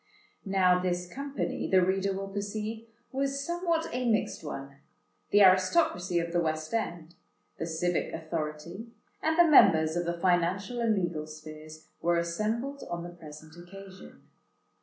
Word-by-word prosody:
Now 185 -2 +4
this 180 -1 -1
company, 275 +8 -4
the 185 -1 +5
reader 195 +1 +1
will 195 +1 -4
perceive, 215 +3 -4 0.2
was 275 +1 -1
somewhat 340 -1 0
a 250 -1 0
mixed 220 - 0
one: 140 -2 -7 0.5
the 205 0 +6
aristocracy 185 - +3
of 170 0 -1
the 175 - +3
West 155 +1 -2
End, 175 -7 -3 0.5
the 165 - -2
civic 170 +1 -1
authority, 160 +5 -5 0.3
and 320 +1 +1
the 345 - +8
members 160 - +6
of 175 0 -1
the 170 0 -2
financial 185 +6 +1
and 225 -2 +2
legal 170 -5 -2
spheres, 155 0 -11
were 170 0 +2
assembled 220 +11 -2
on 170 0 -4
the 175 - -6
present 155 -2 -12
occasion. 190 +2 -12
180 Hz, 145 wpm, -29 LUFS, 170-220 Hz, 0.5 s, the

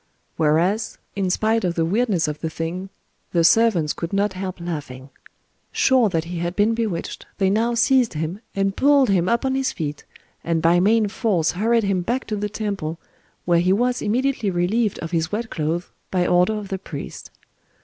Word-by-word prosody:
Whereat, 165 +8 +1 0.2
in 195 -2 0
spite 220 +4 +1
of 175 -2 0
the 165 - +1
weirdness 200 -2 +1
of 150 0 -4
the 160 - -3
thing, 170 +4 -4 0.4
the 170 -2 +3
servants 175 -4 +4
could 170 +3 -5
not 200 0 +1
help 185 -1 -5
laughing. 145 -6 -6 0.6
Sure 255 -5 +3
that 165 -3 -1
he 170 0 -5
had 175 +1 -3
been 210 +2 +3
bewitched, 220 -7 -3
they 195 -2 +2
now 230 +3 +1
seized 245 +1 +3
him, 160 +6 -3
and 195 0 0
pulled 280 -3 +4
him 180 -2 +2
up 235 +2 +1
on 265 - +1
his 265 0 0
feet, 150 -3 -5 0.4
and 165 -1 0
by 170 +2 +4
main 215 +3 +3
force 200 -6 0
hurried 225 +5 +1
him 195 -2 0
back 240 +8 -2
to 215 - -3
the 210 0 -2
temple,—where 175 -4 -3
he 180 +2 +2
was 245 +4 +1
immediately 245 0 0
relieved 195 +5 0
of 165 - -5
his 160 -1 -1
wet 225 +2 -3
clothes, 165 +2 -2 0.2
by 180 -1 +1
order 180 +4 +3
of 210 -2 -6
the 190 - -3
priest. 145 -6 -8
190 Hz, 185 wpm, -22 LUFS, 170-225 Hz, 0.6 s, servants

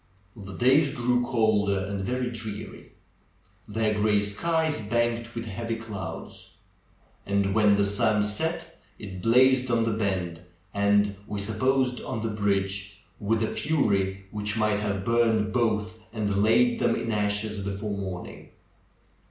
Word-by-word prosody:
The 95 -3 -9
days 135 +4 +4
grew 125 0 +1
colder 110 -5 +2
and 100 0 -4
very 125 +4 -2
dreary; 110 -3 -7 0.7
their 110 0 0
gray 105 0 +2
skies 155 +8 0
banked 115 +1 -1
with 115 0 -4
heavy 115 +2 -4
clouds. 110 -4 -8 0.7
And 100 0 0
when 105 -1 +4
the 100 0 +2
sun 105 +1 +2
set 160 +10 -3 0.2
it 95 -3 -8
blazed 130 +3 +4
on 115 -1 +2
the 115 - 0
bend 95 -6 -2 0.3
and, 100 0 +2
we 105 - -4
supposed, 125 +5 +1
on 120 -4 -4
the 115 - -1
bridge, 100 -1 -1 0.2
with 110 +2 0
a 110 - -2
fury 100 -10 0
which 105 +1 -1
might 105 -2 +2
have 100 -2 -2
burned 115 -2 +2
both 110 -2 0
and 100 -3 -1
laid 235 - +3
them - - +2
in 115 - -3
ashes 105 0 -1
before 100 +1 -4
morning. 95 -3 -7
105 Hz, 140 wpm, -26 LUFS, 100-115 Hz, 0.7 s, days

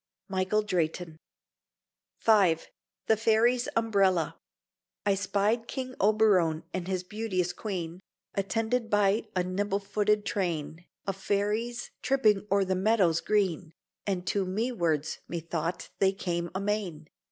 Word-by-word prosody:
Michael 190 +2 +1
Drayton 170 -4 -2 1.1
V 200 -7 +6 0.5
THE 220 - +4
FAIRIES' 230 +3 +3
UMBRELLA 190 -8 +2 0.7
I 200 - +4
spied 205 +4 0
King 255 -1 -4
Oberon 195 -6 +3
and 185 -1 -3
his 185 -1 -1
beauteous 185 -3 -2
Queen 180 -5 -4 0.3
Attended 225 +4 -1
by 205 0 +2
a 180 - +2
nimble 195 +2 -1
footed 205 +1 +1
train 170 -3 -2 0.2
Of 195 -1 -2
Fairies 210 +5 -1
tripping 215 -7 +2
o'er 200 -1 +4
the 190 - 0
meadow's 185 -4 +3
green, 185 -5 0 0.3
And 185 -3 -1
to 200 +1 +1
mewards 185 - -1
(methought) 170 +1 -3
they 195 0 +4
came 175 -3 -2
amain. 190 -6 -2
195 Hz, 120 wpm, -29 LUFS, 180-215 Hz, 1.1 s, V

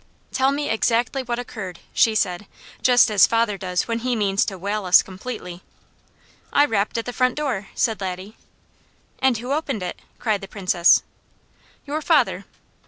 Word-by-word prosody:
"Tell 265 +1 +2
me 290 +1 -2
exactly 230 +4 +1
what 240 -2 -3
occurred," 205 -7 -6 0.2
she 225 -1 +3
said, 190 -1 -1 0.3
just 245 -3 +5
as 205 -2 +6
father 230 -2 +1
does 180 -2 -2
when 230 -1 -1
he 250 +1 -1
means 200 -2 +1
to 195 - -5
whale 200 +2 -3
us 180 0 +6
completely. 185 -2 -8 0.9
"I 290 - +5
rapped 215 -4 -1
at 230 - -2
the 245 - -5
front 255 0 +1
door," 260 -10 -2
said 220 -4 0
Laddie. 190 +2 -5 0.8
"And 260 -3 +2
who 245 +4 -6
opened 280 -9 -2
it?" 180 - -5 0.2
cried 215 -3 -1
the 195 - -8
Princess. 185 -3 +3 0.8
"Your 300 +2 -3
father!" - - +2
220 Hz, 165 wpm, -22 LUFS, 195-245 Hz, 0.9 s, as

